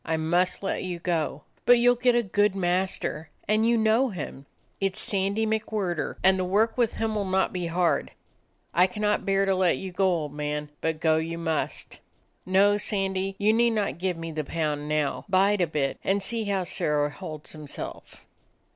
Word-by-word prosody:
I 160 0 -1
must 175 +4 +1
let 195 - -1
you 180 -2 -4
go. 165 -4 -2 0.2
But 245 - +6
you 240 +1 +5
'll - - +1
get 245 0 +2
a 240 - +3
good 205 0 +1
master; 180 -3 -1 0.2
and 215 +2 +3
you 235 0 +3
know 225 +4 +3
him. 145 - -7 0.3
It 195 -1 0
's - - -2
Sandy 200 +2 0
McWhirter, 215 -6 -2
and 190 0 +5
the - - +1
work 210 +5 +2
with 240 -3 +1
him 220 -1 -1
'll 210 - 0
not 190 0 +1
be 180 -2 -2
hard. 170 +1 +1 0.6
I 180 +3 +5
cannot 210 +2 -1
bear 195 0 +3
to 195 - +2
let 185 -2 +2
you 190 - -6
go, 190 +2 +1
old 160 -5 -1
man, 150 0 -3
but 160 -1 -1
go 160 -1 +3
you 165 +1 -3
must. 160 -2 -3 0.5
No, 200 +2 +4
Sandy, 195 -2 -1
you 210 +2 +3
need 235 +1 +3
not 200 -4 -1
give 180 -1 -1
me 165 0 -5
the 155 -1 -3
pound 150 -1 -2
now. 150 -2 0
Bide 195 +1 +3
a 175 - +2
bit, 145 -3 -2
and 195 +1 +1
see 225 +2 -2
how 195 -2 0
Sirrah 150 -3 0
holds 155 +1 -8
himself. 150 -2 -8
185 Hz, 195 wpm, -26 LUFS, 160-205 Hz, 0.6 s, But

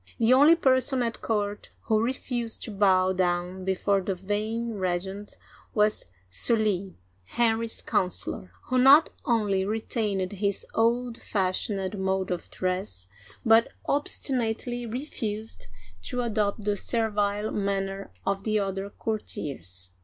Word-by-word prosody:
The 230 +2 +4
only 290 +6 +7
person 260 -4 +2
at 230 -1 -3
court 205 -2 -2
who 220 -1 +1
refused 240 -1 -2
to 225 - -5
bow 190 -2 +3
down 180 0 -1
be 190 0 +1
fore 200 +1 +1
the 190 0 -2
vain 215 +5 -2
regent 190 +3 -3 0.4
was 210 - +2 0.2
Sully, 195 - +1 0.3
Henry's 230 - +1
counselor, 180 - -1
who 255 0 +1
not 275 +5 +7
only 210 -6 +2
retained 210 -2 -1
his 200 -1 -1
old 235 +1 +1
fashioned 195 0 -1
mode 190 0 0
of 180 - -4
dress, 180 - -3 0.4
but 225 +1 +6 0.2
ob 290 +1 +1
stinately 240 -2 -2
refused 220 - -4 0.3
to 245 - -2
adopt 215 -2 -1
the 205 -1 +2
servile 210 -1 0
manner 195 -1 -2 0.2
of 195 0 -1
the 215 -1 +1
other 195 -1 -2
courtiers. 135 - -5
210 Hz, 125 wpm, -27 LUFS, 190-230 Hz, 0.4 s, only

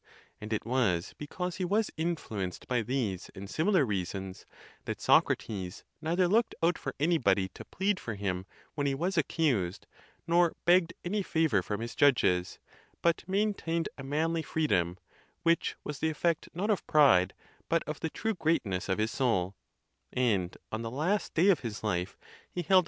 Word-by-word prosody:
And 105 +1 -8
it 110 - -1
was 115 -9 +1
because 180 +4 -4
he 185 - -2
was 205 +4 +1
influenced 115 - -3
by 125 -2 +1
these 110 -6 -2
and 100 +1 -7
similar 160 - +2
reasons 95 -2 -4 0.4
that - - -4
Socrates 95 -3 +1 0.2
neither 175 +3 +2
looked 225 +5 +2
out 170 0 +3
for 135 - -5
anybody 110 - +2
to - - -11
plead 195 +1 0
for 110 - -5
him 95 -2 -3 0.3
when 145 -1 -1
he 135 - +1
was 175 +6 -1
accused, 135 - 0 0.4
nor 170 0 +3
begged 180 0 +4
any 205 +4 0
favor 160 - +2
from 105 +4 -4
his 115 0 -4
judges, 90 -11 +3 0.5
but 170 -1 +2
maintained 190 -5 0
a - - -9
man 155 +4 0
ly 165 - 0
freedom, 95 - 0 0.5
which 165 0 +2
was 150 -2 -5
the 160 - +1
effect 160 +1 0
not 200 +6 -1
of 205 - -1
pride, 135 - +5 0.3
but 165 0 +2
of 150 - -5
the 160 - -2
true 220 +7 -2
greatness 115 - 0
of 95 - +1
his 110 +1 0
soul; 100 -8 +1 0.6
and 105 -8 +1
on 110 - -3
the 115 - -3
last 160 - -1
day 180 +5 +5
of 180 -7 +5
his 110 -4 -6
life 90 -4 -1 0.3
he 175 - -4
held. 185 +3 +6
145 Hz, 170 wpm, -30 LUFS, 100-170 Hz, 0.6 s, held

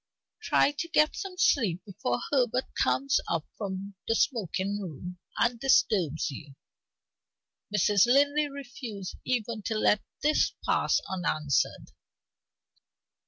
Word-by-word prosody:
Try - - +3
to 335 - -2
get 305 -2 +3
some 385 -2 -6
sleep 200 - +2
before 125 -11 -2
Herbert 255 -2 +2 0.2
comes 275 0 +2
up 165 -2 -1
from 200 -1 -5
the 225 - +2
smoking 205 - 0
room 180 0 -7 0.2
and 235 0 +1
disturbs 185 - +2
you." 140 0 -10 1.2
Mrs. 205 +1 +4
Linley 285 +3 +3
refused 245 -8 -7
even 235 -3 -1
to 220 - -1
let 210 -1 +3 0.2
this 300 +1 +3
pass - - +2
unanswered. 155 -7 -1
215 Hz, 115 wpm, -28 LUFS, 185-265 Hz, 1.2 s, Mrs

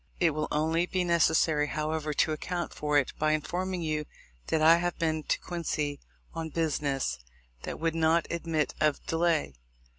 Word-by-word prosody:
It 170 -3 +4
will 155 +1 -2
only 160 +3 +1
be 185 0 0
necessary, 160 -3 +3
however, 155 0 -2
to 150 - +2
account 175 +3 -3
for 150 -1 +1
it 140 - +1
by 155 0 +3
informing 180 +3 -2
you 155 -1 -1 0.4
that 160 - +1
I 160 +2 +7
have 175 0 -2
been 160 -1 0
to - - -1
Quincy 150 -4 -3 0.3
on 160 -1 -4
business 145 - -1 0.5
that - - -5
would 165 0 0
not 165 0 +3
admit 165 -3 -1
of 150 -2 +1
delay. 165 - +1
160 Hz, 160 wpm, -29 LUFS, 150-170 Hz, 0.5 s, I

